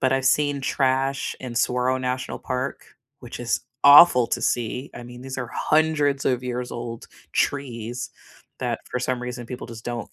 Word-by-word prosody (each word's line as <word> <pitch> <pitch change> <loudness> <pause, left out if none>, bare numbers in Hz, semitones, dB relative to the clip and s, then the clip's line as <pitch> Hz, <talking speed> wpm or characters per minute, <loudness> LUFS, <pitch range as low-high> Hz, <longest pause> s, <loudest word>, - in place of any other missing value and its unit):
but 130 - +2
I've 135 0 0
seen 145 +1 +2
trash 135 0 0
in 125 -2 -6
Saguaro 125 +2 +1
National 130 0 -3
Park, 130 +2 -4 0.4
which 120 -2 -8
is 120 -1 0 0.2
awful 140 -4 +9
to - - -1
see, 125 +3 -1
I 120 - -8
mean, 120 0 -11
these 130 0 -6
are 125 -3 -4
100s 150 -3 +2
of 125 -1 +1
years 125 0 -4
old 120 -1 -6 0.3
trees 120 -3 -2 0.5
that, - - -2
for 125 - -1
some 125 0 -1
reason, 125 0 -5
people 125 +1 -7
just 115 -2 -10
don't 120 -1 -5
125 Hz, 170 wpm, -24 LUFS, 120-135 Hz, 0.5 s, awful